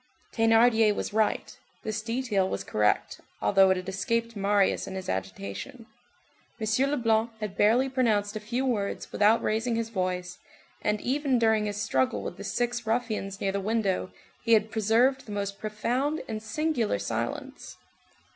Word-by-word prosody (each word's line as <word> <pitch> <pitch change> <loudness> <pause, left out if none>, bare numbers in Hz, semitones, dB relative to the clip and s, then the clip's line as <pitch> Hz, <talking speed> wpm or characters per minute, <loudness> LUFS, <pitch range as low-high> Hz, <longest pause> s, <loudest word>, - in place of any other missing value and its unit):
Thénardier 225 -1 +4
was - - -4
right, 220 0 0 0.3
this 215 0 -3
detail 225 -4 0
was - - -3
correct, 105 0 0 0.2
although 195 -1 +4
it 190 - +3
had 180 0 -6
escaped 230 +4 -1
Marius 200 0 +2
in 190 - -6
his 190 -1 -5
agitation. 100 - -5 0.7
M. 225 +5 +1
Leblanc 230 -5 +2
had 210 -3 -5
barely 235 +6 +4
pronounced 220 -6 +1
a - - -2
few 240 +5 -2
words, 210 -6 -2
without 215 +2 +3
raising 225 +2 0
his 230 0 -2
voice, 180 -3 -3 0.4
and 210 0 0
even 275 0 +1
during 220 -2 +2
his 205 0 -3
struggle 130 - 0
with 175 - -6
the 200 - -7
six 240 +2 -2
ruffians 220 -4 -1
near 195 - 0
the 200 - -1
window 200 -3 0 0.3
he 230 0 +3
had 220 0 +3
preserved 230 +5 +2
the - - -7
most 200 -1 -3
profound 245 +8 -1
and 215 -1 -4
singular 250 0 0
silence. - - -4
220 Hz, 155 wpm, -27 LUFS, 200-235 Hz, 0.7 s, Thénardier